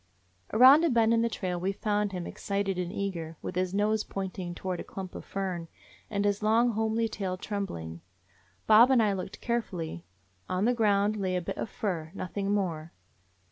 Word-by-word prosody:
Around 260 +8 +8
a 335 - +4
bend 230 -2 +4
in 230 - +3
the 230 - +1
trail 180 -5 -3
we 185 +3 0
found 205 0 -1
him, 180 -2 -4
ex - - -9
cited 200 -2 -1
and 180 -1 -2
eager, 170 -5 -4
with - - -4
his 185 0 0
nose 210 +2 +1
pointing 185 -2 -5
toward 180 -1 -3
a - - -4
clump 190 -2 -7
of - - -7
fern, 185 -4 -4 0.4
and 200 -1 -1
his 205 0 +1
long, 225 +3 +3
homely 220 +1 0
tail 190 -4 -3
trembling. 85 - -5 0.6
Bob 220 +3 +7
and 255 -4 +5
I 205 -2 +2
looked 190 +1 -6
carefully. 175 - -3 0.4
On 185 +2 0
the 245 - +3
ground 210 -2 +2
lay 190 -2 -1
a - - +2
bit 190 +3 -5
of - - -3
fur, 175 -8 -3
nothing 195 +2 -3
more. 170 -6 -2
200 Hz, 190 wpm, -29 LUFS, 180-215 Hz, 0.6 s, Around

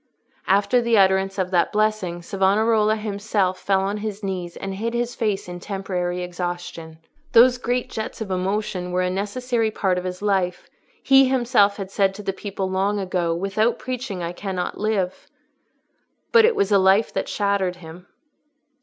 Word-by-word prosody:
After 205 +6 +3
the 235 -1 +2
utterance 190 0 +3
of 185 -1 -1
that 175 -2 +2
blessing, 210 -5 0
Savonarola 210 +4 +2
himself 205 -3 -1
fell 195 -1 +1
on 200 +2 -2
his 210 -1 -5
knees 180 -3 -4
and 195 0 -5
hid 230 +4 -3
his 240 0 -1
face 210 -6 -2
in 175 0 -7
temporary 180 -2 -3
exhaustion. 175 -2 -5 0.4
Those 250 +2 +6
great 245 0 -1
jets 220 - -5
of 215 -4 -5
emotion 185 0 -2
were 180 0 +1
a 180 - 0
necessary 225 +4 -1
part 190 -4 0
of - - -7
his 185 +1 -5
life; 190 -3 -1 0.3
he 270 0 +6
himself 240 -6 +3
had 195 -2 -6
said 195 -1 +1
to 210 - -8
the 195 - -2
people 195 -1 -4
long 195 +2 0
ago, 180 -4 -1
"Without 195 +6 0
preaching 250 -8 -5
I 170 - -3
cannot 185 -1 -4
live." 205 -4 -1 1.0
But 460 -1 +7
it 460 - +3
was 200 +1 +1
a 200 - +5
life 190 +3 +3
that - - -2
shattered 200 -3 0
him. 175 +1 -12
195 Hz, 170 wpm, -22 LUFS, 185-215 Hz, 1.0 s, But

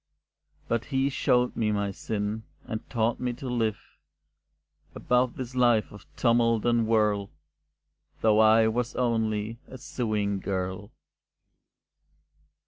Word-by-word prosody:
But 115 -1 -1
he 135 +1 0
showed 125 -1 +1
me 110 -2 0
my 100 -1 -1
sin, 105 +2 -3 0.2
and 110 -3 -6
taught 115 0 0
me 125 -1 -2
to 130 +2 -8
live, 115 -4 0 1.2
Above 125 0 +1
this 125 -1 -6
life 120 -4 +3
of 105 -1 -13
tumult 115 -2 +2
and 120 -2 +2
whirl, 105 -3 +2 0.9
Though 110 -1 +4
I 110 0 +6
was 120 +2 -1
only 110 -2 -1
a 130 - -10
sewing 105 -5 -2
girl. 95 +1 -3
110 Hz, 120 wpm, -27 LUFS, 105-120 Hz, 1.2 s, I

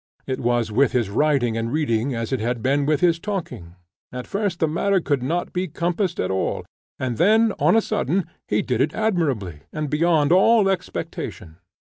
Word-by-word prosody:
It 130 - -3
was 120 -2 0
with 135 +5 +2
his 120 -6 0
writing 135 -2 +2
and 115 +1 -2
reading 130 -4 0
as 115 +2 -3
it 130 - 0
had 120 +1 -2
been 140 +2 +1
with 155 -1 +1
his 170 -2 +3
talking; 165 - -5 0.4
at 125 0 -6
first 200 -4 -2
the 160 - +2
matter 190 +5 +1
could 145 -6 -1
not 170 +8 -2
be 185 +1 -1
compassed 175 +3 -2
at 90 - 0
all, 95 - -2 0.3
and 125 -3 -3
then 220 +5 +4
on - - +4
a 225 - +5
sudden 180 +7 0 0.2
he - - +1
did - - -1
it - - 0
admirably, 145 - -1
and 150 -2 -4
beyond 155 -1 +2
all 205 +3 +5
expectation. 175 - -4
150 Hz, 185 wpm, -22 LUFS, 120-180 Hz, 0.4 s, a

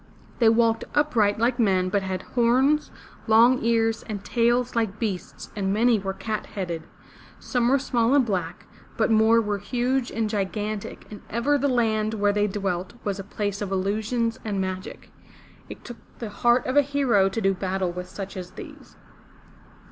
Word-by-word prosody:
They 230 -2 +6
walked 225 0 +2
upright 235 -9 +2
like 240 +2 +1
men 190 -4 +2
but 200 +1 +1
had 190 -1 -4
horns, 260 +5 +3 0.4
long 235 +3 +5
ears, 225 -1 +1
and 205 -2 -5
tails 240 +1 +1
like 220 -3 0
beasts 205 -6 -5
and 195 -2 -1
many 225 +2 +3
were 195 0 -3
cat 215 +2 -4
headed. 175 -5 -4 0.6
Some 245 -1 0
were 275 - +4
small 245 -1 +1
and 275 -3 +4
black, 180 -5 -3 0.3
but 225 0 +2
more 220 +1 +5
were 210 -2 -1
huge 250 +4 -1
and 225 -1 -1
gigantic, 210 0 -3
and 210 - -9
ever 235 +6 +1
the 285 0 +1
land 220 -4 +1
where 205 -1 +2
they 210 0 +1
dwelt 190 -2 -3
was 200 -2 -2
a - - -4
place 205 0 -4
of 200 -2 -3
illusions 220 +5 -1
and 205 -3 -2
magic. 185 0 -5 0.6
It - - -10
took 240 -1 -8 0.2
the 225 -3 -6
heart 240 +4 +2
of 255 - -2
a 290 - +7
hero 265 -9 +2
to 195 - -3
do 195 -3 +2
battle 190 -1 -2
with 180 +1 -7
such 195 +1 -7
as 180 -1 -6
these. - - -12
220 Hz, 175 wpm, -25 LUFS, 195-235 Hz, 0.6 s, a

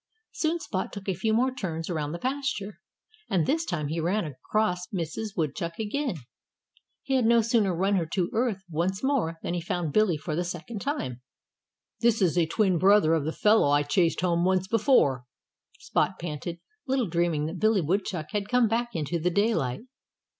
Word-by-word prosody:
Soon 325 +1 -1
Spot 185 - -3
took 200 -1 -8
a 190 - +1
few 190 +5 -1
more 250 +4 +2
turns 165 -10 -4
around 155 -4 -2
the 170 - -4
pasture. 260 -4 -3 0.5
And 180 -6 +2
this 320 - +1
time 155 - -2
he 165 +2 -2
ran 180 +5 0
across 180 +6 -1
Mrs. 190 +4 -4
Woodchuck 165 +1 -2
again. 230 +2 -2 0.9
He 270 - -2
had 255 -3 +3
no 235 0 +5
sooner 225 -4 +2
run 195 +3 +2
her 165 -3 -1
to 175 +1 -1
earth 225 -5 0
once 175 +5 -2
more 255 - 0
than - - -2
he 175 - -2
found 170 -3 -2
Billy 215 -7 +3
for 155 +1 -4
the 175 - 0
second 180 +5 -6
time. 130 - -3 0.8
"This 230 -1 +3
is 180 -5 +2
a 170 -2 +3
twin 185 -1 +2
brother 190 -3 +5
of 160 -3 +1
the 160 - -1
fellow 210 -3 +4
I 145 0 +3
chased 165 +4 +1
home 170 -2 +1
once 185 0 +2
before," 195 - +3 0.5
Spot 190 - 0
panted, 170 +1 -5 0.3
little 260 -3 +1
dreaming 170 -3 0
that 160 - -5
Billy 215 -2 +3
Woodchuck 170 -2 -2
had 205 -1 -2
come 245 -1 +4
back 235 +1 -1
into 165 +2 -1
the 175 +3 +1
daylight. 180 - 0
185 Hz, 185 wpm, -27 LUFS, 165-220 Hz, 0.9 s, no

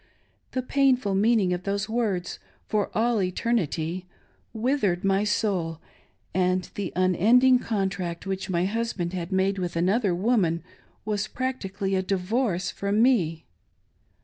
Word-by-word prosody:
The 255 - -1
painful 255 -6 +2
meaning, 205 -2 +3
of 175 - -3
those 200 +1 -2
words, 215 -6 -2 0.3
"for 210 -2 0
all 230 -1 +2
eternity'' 180 -3 -1 0.4
withered 220 -6 0
my 195 +1 +2
soul, 195 -6 0 0.6
and 185 0 +1
the 200 -3 -4
unending 225 +8 +4
contract 190 -6 -2
which 190 0 -3
my 175 -1 +1
husband 200 -4 -2
had 180 0 -4
made 190 +1 +1
with 175 -2 -3
another 190 +3 +2
woman 180 -5 +1 0.4
was 210 -1 -1
practically 200 -7 -3
a 190 - +2
divorce 190 0 -1
from 200 +3 +1
me. 170 -11 +2
195 Hz, 125 wpm, -26 LUFS, 180-225 Hz, 0.6 s, unending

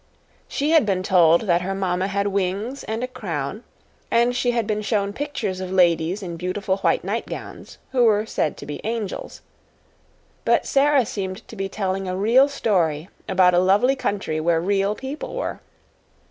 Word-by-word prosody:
She 290 +3 -1
had 320 -4 +6
been 190 -3 0
told 170 -3 +5
that 175 -5 +2
her 195 +2 -3
mamma 185 -1 0
had 200 0 -1
wings 200 +6 -2
and 225 +2 -3
a - - -1
crown, 185 - -5 0.5
and 240 +1 +3
she 245 0 +1
had 235 -2 +1
been 215 0 -1
shown 205 -2 -1
pictures 220 -9 -3
of 185 -1 -5
ladies 175 +1 +2
in 170 -2 -5
beautiful 190 +2 -2
white 195 - +1
nightgowns, - - -6
who 250 -2 +3
were 215 -1 +3
said 155 - -1
to - - -9
be 145 - -6
angels. 220 -3 -4 1.0
But - - +2
Sara 280 -2 +3
seemed 190 -3 -5
to - - -10
be 195 -1 -3
telling 195 -1 -2
a 185 0 -2
real 240 +8 +4
story 175 - 0 0.2
about 185 -1 +4
a 175 - +5
lovely 205 +9 +3
country 205 -10 -2
where 165 +1 +2
real 200 +3 +1
people 270 - -6
were. - - -3
200 Hz, 175 wpm, -23 LUFS, 185-230 Hz, 1.0 s, had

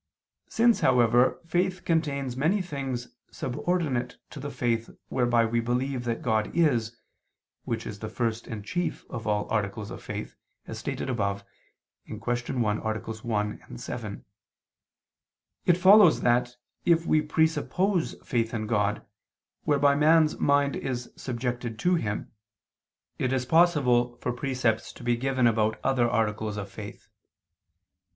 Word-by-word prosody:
Since, 235 0 +3
however, 120 -1 +4
faith 180 +2 -1
contains 140 -6 0
many 160 +10 +2
things 135 -7 -4 0.2
subordinate 130 -3 -2
to 150 - -8
the 145 +2 -5
faith 115 -4 -1 0.2
whereby 120 -2 +2
we 115 +1 0
believe 125 +2 -1
that 115 -1 -2
God 110 -2 +1
is, 120 -9 +2 0.7
which 115 -1 -3
is 105 -1 -7
the 110 - -5
first 115 0 -2
and 105 -3 -6
chief 175 +8 -3
of 115 -2 -5
all 105 -1 0
articles 105 -1 -2
of - - -8
faith, - - -6 0.3
as - - -7
stated - - -4
above 100 -5 -1 0.6
(Q. - - -6
1, 120 -3 -1
AA. 110 0 -2
1, 110 - -4
7), 105 - -6 1.4
it 175 - +5
follows 190 -1 +7
that, 120 0 +2 0.3
if 170 -1 +3
we 155 - +3
presuppose 160 +4 +1
faith 115 -2 0
in 110 -1 -2
God, 105 -1 0 0.6
whereby 145 -1 +4
man's 155 +2 +4
mind 140 0 +3
is 125 -2 -4
subjected 120 -2 -4
to 180 +9 +2
Him, 105 -12 -2 0.9
it 130 - 0
is 130 -1 0
possible 125 -7 +3
for 125 - -2
precepts 125 -3 -1
to - - -12
be 120 0 +2
given 130 0 0
about 110 -1 +2
other 130 -3 +2
articles 110 -2 -1
of 100 -1 -6
faith. 105 +1 -9
120 Hz, 135 wpm, -27 LUFS, 110-145 Hz, 1.4 s, follows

